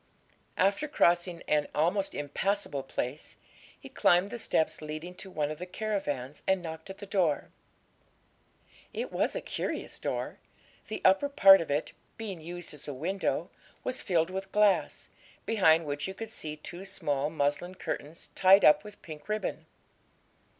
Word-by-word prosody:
After 200 +10 +2
crossing 175 - +2
an 150 -1 +2
almost 180 +6 +1
impassable 145 +1 -1
place, 135 +2 -5 0.4
he - - -11
climbed 180 +4 +3
the 240 - -5
steps 160 -8 +1
leading 155 +3 -6
to 190 - -9
one 150 -4 -1
of 155 - -6
the 180 - -6
caravans 165 - -3
and 190 -1 +2
knocked 160 +2 -7
at 190 - -7
the 205 - -8
door. 180 -7 0 1.4
It - - -4
was - - 0
a - - -2
curious - - -4
door; - - -3 0.5
the - - -5
upper 190 +10 +5
part 195 -9 +8
of 165 - -5
it, 145 +2 0 0.3
being 200 -7 -6
used 175 +1 -7
as 150 - -10
a 145 - -4
window, 185 +8 -1 0.3
was 255 - -2
filled 170 -1 +1
with 190 +1 -5
glass, 210 -2 +2 0.4
behind 165 -7 +4
which 145 +2 -3
you 190 - -6
could 225 +1 -7
see 155 -7 -5
two 175 +4 -9
small 145 -7 -1
muslin 155 +4 -1
curtains, 160 -3 -5
tied 195 +1 +6
up 200 0 +7
with 210 -1 -12
pink 155 +2 -10
ribbon. 215 0 -2
175 Hz, 155 wpm, -30 LUFS, 150-195 Hz, 1.4 s, part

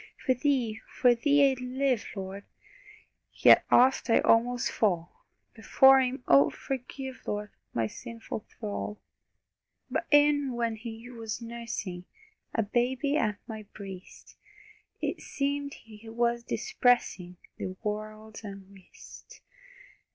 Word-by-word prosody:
For 260 - +4
Thee, 250 -4 0
for 245 -1 +3
Thee 280 +3 +4
I'd 260 - -5
live, 255 -1 0
Lord! 195 0 -6 0.9
Yet - - +7
oft 255 +1 +4
I 225 - +5
almost 245 +2 +2
fall 175 -6 -1 0.3
Before 265 +4 +6
Him 255 0 -2
Oh, 140 +1 +6
forgive, 265 0 -6
Lord, 210 0 -3 0.2
My 115 - 0
sinful 230 - -7
thrall! 210 -1 -5 0.9
But - - -1
e'en 290 -2 +4
when 230 -1 -1
He 225 +1 -8
was 225 -3 -5
nursing, 230 -6 -6 0.5
A 225 - +2
baby 250 +6 0
at 215 -8 +1
my 220 -1 -7
breast, 195 -3 -11 0.6
It - - -2
seemed 280 0 -2
He 225 0 -14
was 235 +1 0
dispersing 240 - 0 0.2
The 185 - -4
world's 215 +1 -5
unrest. 195 -2 -12
230 Hz, 115 wpm, -29 LUFS, 210-260 Hz, 0.9 s, Yet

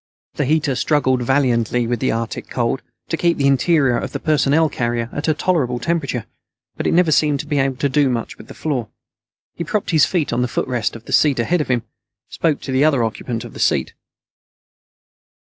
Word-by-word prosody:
The - - -1
heater 150 0 +1
struggled 130 -2 +1
valiantly 120 -2 +1
with 120 0 -1
the - - +1
Arctic 115 0 -4
cold 120 +1 -1 0.3
to 165 - -1
keep 170 0 +1
the 140 - +1
interior 140 -2 +3
of 135 - -6
the - - -3
personnel 155 0 +2
carrier 120 -4 -2
at 145 - -3
a 155 - +2
tolerable 155 -8 0
temperature, 140 -3 -2 0.5
but - - -2
it - - +2
never 175 -2 +4
seemed 150 -1 +2
able 135 -2 +1
to 140 +2 0
do 140 0 +2
much 120 -2 -3
with - - -12
the - - -11
floor. 130 -8 -2 0.6
He 170 - -5
propped 200 +4 -2
his 160 -2 +5
feet 165 -9 -1
on 120 - +1
the 125 - +1
footrest 120 -4 -2
of 115 - -11
the - - -6
seat 145 -3 +4
ahead 160 +9 +1
of - - -3
him, 120 -3 +1 0.5
spoke 155 -4 0
to - - -5
the 130 +2 +3
other 140 -6 +3
occupant 115 +1 -3
of - - -10
the - - -10
seat. - - +1
135 Hz, 200 wpm, -20 LUFS, 120-155 Hz, 0.6 s, his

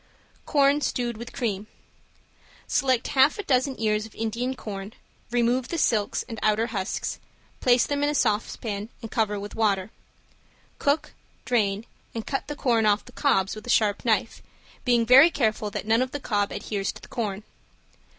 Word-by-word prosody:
~CORN 285 0 +3
STEWED 240 -3 -1
WITH 235 +2 -8
CREAM~ 210 -3 -3 1.0
Select 260 -3 +1
a - - -4
half 275 +2 +4
dozen 260 0 +1
ears 215 -1 0
of 220 - -20
Indian 235 +4 -2
corn, 200 -2 -7 0.4
remove 240 +1 +1
the 335 - -3
silks 220 -9 +1
and 225 -3 -6
outer 215 +1 +2
husks, 190 -3 -3 0.4
place 245 -1 +4
them 285 0 -1
in 290 - +3
a 295 - -1
saucepan 215 -2 -1
and 225 - -7
cover 210 -2 0
with 205 +1 -7
water. 205 -2 +1 0.9
Cook, 285 +2 0 0.3
drain, 210 -3 +1 0.3
and 225 - -4
cut 270 - -3
the 295 - -4
corn 235 -6 +2
off 210 0 +2
the 250 - -13
cobs 195 -10 +1
with 215 +2 -9
a - - -6
sharp 210 -4 +2
knife, 225 -1 0 0.4
being 240 -2 +3
very 270 +7 +8
careful 220 -7 0
that 205 - -5
none 225 +2 +3
of 255 - 0
the 290 - -5
cob 205 -6 0
adheres 200 -2 -3
to - - -13
the - - -11
corn. 210 -3 -3
225 Hz, 170 wpm, -25 LUFS, 210-255 Hz, 1.0 s, very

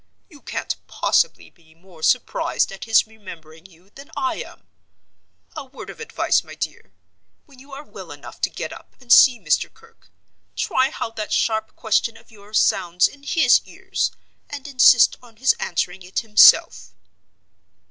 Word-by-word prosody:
You 290 -3 -16
can't - - -4
possibly - - 0
be 160 -2 -26
more 170 -1 -19
surprised 245 +3 0
at 195 - -9
his 225 -1 +4
remembering 175 -6 -14
you 180 +2 -24
than 280 +5 -14
I 340 -2 -2
am. - - -10 0.9
A 305 - -6
word 270 +1 -11
of - - -16
advice, 460 0 0
my - - -12
dear. - - -7 0.5
When 275 -4 -20
you 275 +2 -17
are 280 +2 -8
well - - -12
enough - - -12
to - - +1
get - - -7
up - - -15
and 245 -2 +2
see 250 -4 +7
Mr. 155 -6 0
Kirke, 455 0 -24 0.5
try 265 -9 0
how 230 - -5
that 215 -2 -6
sharp 220 -1 -1
question 230 0 -1
of 225 +1 -21
yours 210 0 -6
sounds 175 0 +2
in 285 - -16
his 285 -2 +3
ears, - - -3 0.4
and 290 0 -8
insist 255 -3 +5
on 240 -2 -19
his 260 +4 +2
answering 180 +1 -3
it 180 +1 -4
himself." 215 -2 +5
225 Hz, 165 wpm, -21 LUFS, 190-275 Hz, 0.9 s, see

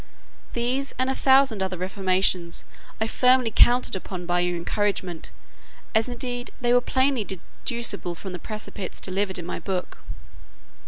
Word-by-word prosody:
These, 255 +3 -1
and 260 +1 +1
a - - -2
thousand 265 -6 +4
other 190 -1 -2
reformations, 185 -2 +1 0.3
I 220 - +1
firmly 250 0 +3
counted 245 -3 +5
upon 185 -1 -6
by 175 0 +1
your 175 0 0
encouragement; 185 -1 -2 0.6
as 220 +2 +3
indeed 245 0 -3
they 240 -1 +2
were 245 - +5
plainly 260 -2 +2
deducible 200 0 -3
from 190 +2 -7
the 180 - -5
precepts 215 -2 -6
delivered 190 0 0
in 175 - -6
my - - -4
book. 185 -2 -4
205 Hz, 145 wpm, -25 LUFS, 185-245 Hz, 0.6 s, counted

